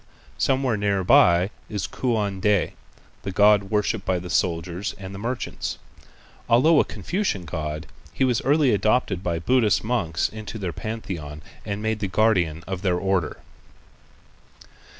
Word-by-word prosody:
Somewhere 130 -4 +1
near 100 -2 0
by 90 +2 +5 0.2
is 105 -3 -3
Kuan 105 -6 -1
Ti, 105 -3 +2 0.5
the - - -5
god 100 +1 +4
worshipped 105 0 0
by 95 -1 0
the 90 0 -6
soldiers 85 +3 -1
and 95 0 -8
merchants. 115 +6 -4 0.7
Although 150 +7 +5
a - - +5
Confucian 180 - -3
god, 75 0 -4 0.3
he - - -1
was 125 -1 +2
early 140 -2 +3
adopted 105 -3 +1
by 85 -2 -1
Buddhist 115 +5 +2
monks 100 -9 0
into 110 +1 -8
their 95 -5 -4
pantheon 85 -10 -6 0.2
and 100 +1 -3
made 110 0 -1
the 105 - -1
guardian 95 -6 +1
of 95 -1 -4
their 90 -3 +1
Order. 95 -4 -1
100 Hz, 140 wpm, -24 LUFS, 90-110 Hz, 0.7 s, by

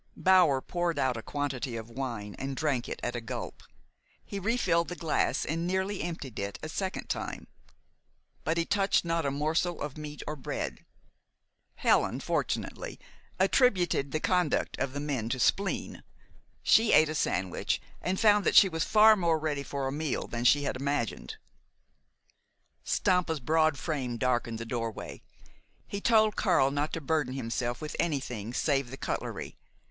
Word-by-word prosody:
Bower 180 -8 +5
poured 175 0 -2
out 130 -3 +1
a 115 - -5
quantity 135 -1 -3
of 110 -1 -6
wine 115 -5 -4
and 135 0 -3
drank 140 -6 0
it - - -5
at 120 - -2
a 120 - -3
gulp. 115 - -6 0.6
He 200 - -5
refilled 185 -6 +1
the 180 - -5
glass 165 -3 0
and 165 +2 -2
nearly 190 +2 -1
emptied 155 -9 -5
it 100 0 -3
a 155 - -4
second 190 +3 -3
time. - - -4 1.0
But 160 +2 0
he 170 - +1
touched 195 -2 +2
not 165 -3 0
a - - +2
morsel 155 +5 0
of 150 0 -5
meat 150 -1 -7
or 155 - -4
bread. 135 - -5 0.9
Helen, - - +2
fortunately, - - -3 0.4
attributed 190 - +3
the 155 - 0
conduct 180 -2 +1
of 135 0 -1
the 145 - -3
men 135 -6 -2
to 130 - -2
spleen. 195 +9 0 0.6
She 225 0 +5
ate 155 +1 +7
a - - -2
sandwich, 90 - -1 0.2
and 185 +1 -1
found 210 -2 +5
that - - +1
she 195 - +9
was 160 -2 -1
far 215 0 +6
more 170 -5 +2
ready 150 -2 -2
for 140 -1 -4
a - - -2
meal 150 -1 -2
than 120 0 -4
she 145 +3 +5
had 140 - -1
imagined. 140 -3 -2 1.5
Stampa's 180 -5 +1
broad 155 +2 +2
frame 130 -7 -3
darkened 120 -2 0
the 115 - -5
doorway. 115 -1 -4 0.6
He 200 - -5
told 220 -2 +4
Karl 135 +1 +3
not 145 +2 -1
to 165 - -3
burden 145 -3 0
himself 120 -1 -2
with 155 -1 -6
anything 125 -9 -2
save 135 0 0
the 135 - -8
cutlery. - - -4
150 Hz, 165 wpm, -29 LUFS, 130-175 Hz, 1.5 s, she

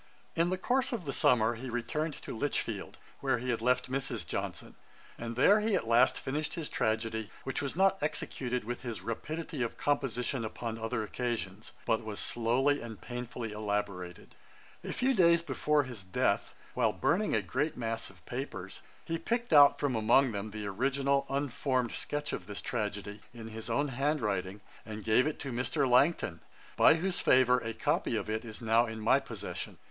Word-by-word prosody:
] - - -33
In 170 +1 +2
the 185 - 0
course 255 +7 +1
of 210 -8 -3
the 135 - -3
summer 120 -3 +4
he 125 +3 -6
returned 150 +6 -2
to - - -6
Lichfield, 145 +5 -2 0.2
where 135 -2 +1
he 125 +2 -2
had 115 - -1
left 125 +2 +2
Mrs. 130 -7 -3
Johnson, - - -4 0.4
and 115 0 -5
there 200 - +6
he 210 -1 +1
at 115 - -1
last 120 +3 +5
finished 150 +4 -3
his 165 -4 -4
tragedy, 110 -1 -1
which 135 - -2
was 140 0 -3
not 195 +1 +3
executed 125 -5 -2
with 120 +3 -4
his 120 -4 -5
rapidity 155 +5 -4
of 115 - -2
composition 130 -3 0
upon 115 +1 -4
other 115 0 -2
occasions, 110 -3 -4
but 115 0 +1
was 110 -2 -4
slowly 130 +5 +1
and 115 -2 -8
painfully 120 -2 -5
elaborated. 100 -4 -3 0.5
A - - -4
few 260 +2 +2
days 170 -5 +5
before 150 -3 +1
his 120 -7 -7
death, 95 -1 0 0.2
while - - +2
burning 205 - +1
a 110 - +2
great 140 - -1
mass 115 -2 -3
of 95 -2 -18
papers, 110 -7 -6 0.2
he 165 0 -2
picked 235 +3 -1
out 145 -1 +8
from 140 -4 0
among 120 +4 +4
them 100 0 -4
the 105 0 -6
original 140 +6 +1
unformed 135 -3 0
sketch 145 0 -3
of 90 - -5
this 105 -1 -5
tragedy, 105 -2 -3
in 115 -1 -8
his 110 +1 -7
own 140 +5 +1
hand 140 +4 0
writing, 100 -3 -2 0.2
and 110 -1 -7
gave 115 +5 +4
it 155 - -2
to 135 - -4
Mr. 130 +4 0
Langton, 125 - +3 0.4
by - - +7
whose 180 +2 -1
favour 125 -1 +5
a 115 -2 -5
copy - - 0
of - - -2
it 110 +2 -2
is 110 0 -8
now 115 +2 +4
in 110 0 -6
my 110 - +4
possession. - - -6
125 Hz, 185 wpm, -31 LUFS, 110-145 Hz, 0.5 s, out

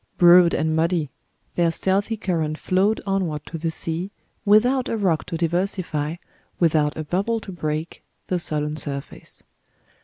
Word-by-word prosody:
Broad 175 0 +7
and 155 0 0
muddy, 165 -3 +1 0.4
their 170 -1 +2
stealthy 195 +6 0
current 165 -7 -1
flowed 195 +6 +1
onward 185 -7 -1
to 165 - -7
the 165 +1 -1
sea, 165 +3 -3 0.4
without 245 +5 +4
a 230 - -1
rock 180 -7 +1
to 165 - -4
diversify, 170 -2 -1 0.4
without 155 -3 +2
a 155 - -3
bubble 195 +9 0
to 200 -2 -9
break, 155 -2 -4 0.2
the 180 - -1
sullen 150 -2 -2
surface. 140 -2 -6
170 Hz, 145 wpm, -23 LUFS, 155-195 Hz, 0.4 s, Broad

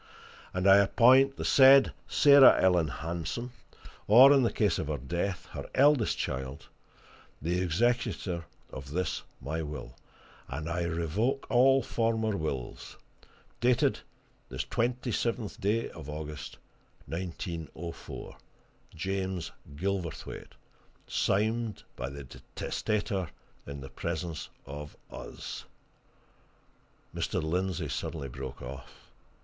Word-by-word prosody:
And 90 +1 0
I 95 0 +9
appoint 130 +6 +5
the - - -4
said 135 0 +7
Sarah 140 -2 +7
Ellen 90 -4 +4
Hanson, 85 - -4 0.6
or 130 +7 +9
in 140 - +5
the 120 - +2
case 105 -2 +1
of 80 - -3
her 75 -1 -1
death, 85 +8 -3
her - - -7
eldest 140 -4 +4
child, 65 +1 -4 0.7
the 85 +4 -1
executor 95 -2 0 0.3
of 65 +1 -8
this 90 +5 -2 0.2
my 80 +4 -3
will; 75 -5 -6 0.5
and 80 +1 -5
I 85 +1 -1
revoke 85 - -1
all 135 +1 +5
former 110 -2 0
wills. 70 -8 -5 0.6
Dated 120 0 +2 0.5
this 65 +1 -3
twenty 120 - -1
seventh 115 -2 -2
day 105 +4 0
of 75 -2 -10
August, 75 -1 -6 0.5
1904. 85 -1 -6 0.6
James 95 +1 -3 0.2
Gilverthwaite. 90 0 -4 0.5
Signed 110 +2 0
by 65 - -4
the 70 +1 -8 0.3
testator 100 -4 -1 0.4
in 70 0 -6
the 65 - -8
presence 80 +4 -4 0.2
of 75 +2 -8
us - - -7 0.7
" - - -31
Mr. - - -1
Lindsey 90 +3 -1
suddenly 70 -5 -4
broke 65 0 -7
off. 65 +2 -9
90 Hz, 110 wpm, -30 LUFS, 75-115 Hz, 0.7 s, I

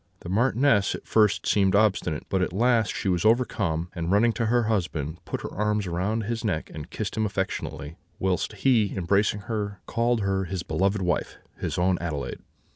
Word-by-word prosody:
The 85 - -8
Marchioness 120 +1 +3
at - - -10
first 105 -3 +3
seemed 95 -2 +3
obstinate; 100 -7 +1
but 95 - 0
at 90 - 0
last 115 +2 +2
she - - -3
was 90 -2 +1
overcome, 100 -8 +1
and 85 -1 -3
running 115 +4 +4
to 115 0 -1
her 120 +1 +3
husband, 85 -8 -2
put - - -4
her - - -6
arms 105 -1 0
round 95 +6 -1
his 115 +2 -3
neck, 95 -8 -2
and 75 +2 -7
kissed 105 -2 -4
him 110 - 0
affectionately; 95 -5 -4 0.2
whilst 95 +2 -1
he, 105 -1 +2
embracing 100 +3 +1
her, 100 -1 -4
called 115 0 +1
her 95 -1 0
his 90 -1 -4
beloved 95 +5 0
wife, 90 -2 -1 0.2
his - - -3
own 90 0 +2
Adelaide. 75 -5 -4
100 Hz, 185 wpm, -26 LUFS, 90-110 Hz, 0.2 s, running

